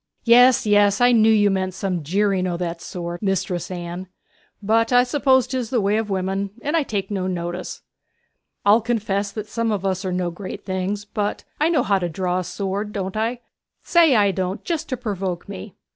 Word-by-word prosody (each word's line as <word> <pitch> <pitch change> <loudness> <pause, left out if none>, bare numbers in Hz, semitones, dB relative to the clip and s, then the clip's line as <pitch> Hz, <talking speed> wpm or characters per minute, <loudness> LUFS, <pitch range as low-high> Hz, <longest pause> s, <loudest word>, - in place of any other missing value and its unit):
'Yes, 245 +1 +6
yes! 205 -1 +4
I 245 0 +5
knew 225 -2 +5
you 205 -2 +4
meant 185 -1 -1
some 185 -4 -2
jeering 190 +3 +1
o' 175 -1 -2
that 170 -1 -4
sort, 175 -1 -6
Mistress 190 -3 -1
Anne. 175 0 -6 0.5
But 225 +3 +1
I 245 0 +6
suppose 260 0 +3
'tis 255 -3 -3
the 245 - +1
way 205 +1 +1
of 220 -1 -2
women, 195 +1 -1
and 295 +3 -1
I 330 - +3
take 205 -7 -3
no 190 -2 -1
notice. 175 0 -4 0.8
I'll 210 +3 +6
confess 205 -3 -1
that 215 -2 -5
some 230 +1 -2
of 200 -2 -2
us 190 0 -1
are 185 - -2
no 180 -1 -1
great 185 +2 -8
things: 190 +2 -2
but 210 0 -3 0.2
I 310 +2 +3
know 335 - +2
how 195 -1 +2
to 175 -1 -2
draw 180 +2 -1
a - - -3
sword, 200 +3 -4
don't 190 -1 -4
I? 230 +3 -1 0.4
say 330 -6 +4
I 205 -2 +4
don't 190 +2 -3
just 330 -2 -2
to 255 - -2
provoke 195 -7 -4
me.' 95 - -8
200 Hz, 200 wpm, -22 LUFS, 185-225 Hz, 0.8 s, Yes